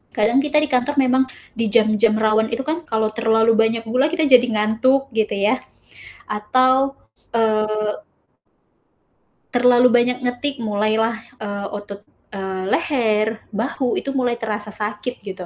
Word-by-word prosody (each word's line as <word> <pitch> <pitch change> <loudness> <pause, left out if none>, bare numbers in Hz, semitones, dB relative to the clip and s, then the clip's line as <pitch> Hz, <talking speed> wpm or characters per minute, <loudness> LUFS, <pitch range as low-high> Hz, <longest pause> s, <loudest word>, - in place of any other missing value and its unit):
kadang 230 +4 +3
kita 300 0 0
di - - 0
kantor 255 +3 0
memang 260 -1 +3 0.3
di 230 -1 -1
jam-jam 215 0 +3
rawan 220 0 +2
itu 250 +3 -3
kan 320 +2 -2
kalau 220 -1 +1
terlalu 225 0 +2
banyak 225 0 +1
gula 255 +7 +1
kita 320 -2 0
jadi 255 -3 +6
ngantuk 230 +6 +1
gitu 215 -2 0
ya. 210 +6 +1 0.7
Atau, 255 +6 +1 0.4
eee 215 -1 +1 1.6
terlalu 245 0 +4
banyak 245 +1 +3
ngetik, 255 +3 -2
mulailah, 220 +1 0 0.2
eee, 200 -1 -5
otot, 205 -1 -8 0.3
eee, 190 -1 -4
leher, 225 -9 +1 0.3
bahu, 245 +3 -2
itu 275 - -6
mulai 255 -3 0
terasa 210 -2 -5
sakit 210 +3 -5
gitu. 190 -3 -8
225 Hz, 135 wpm, -20 LUFS, 215-255 Hz, 1.6 s, jadi